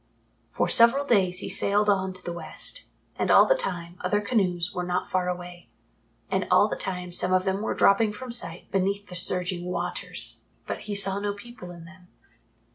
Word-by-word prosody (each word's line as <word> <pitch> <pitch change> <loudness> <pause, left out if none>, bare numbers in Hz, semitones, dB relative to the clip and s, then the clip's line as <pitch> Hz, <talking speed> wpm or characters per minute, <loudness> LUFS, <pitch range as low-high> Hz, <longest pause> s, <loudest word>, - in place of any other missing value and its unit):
For - - -1
several 235 +5 +5
days 185 -7 +2
he - - -5
sailed 205 +2 +1
on 190 -2 +1
to 185 0 -13
the 175 - -4
West, 170 - -3 0.3
and - - -1
all - - +7
the - - +4
time 175 - -4
other 205 +3 +1
canoes 185 -5 0
were 180 - -3
not 180 0 -2
far 180 -1 0
away, 175 0 -7 0.6
and - - -1
all - - +5
the - - -3
time 180 -2 -4
some 180 +1 +2
of 185 0 +3
them 195 +1 -1
were 220 - -2
dropping 210 +2 +4
from 250 +4 -8
sight 205 -7 -3
beneath 200 +1 -1
the 180 - -8
surging 180 0 -2
waters, 180 0 -1 0.2
but - - -6
he 205 - -2
saw 195 0 +3
no 205 0 -2
people 205 -3 -11
in 170 -2 -11
them. 185 0 -16
185 Hz, 195 wpm, -26 LUFS, 180-205 Hz, 0.6 s, all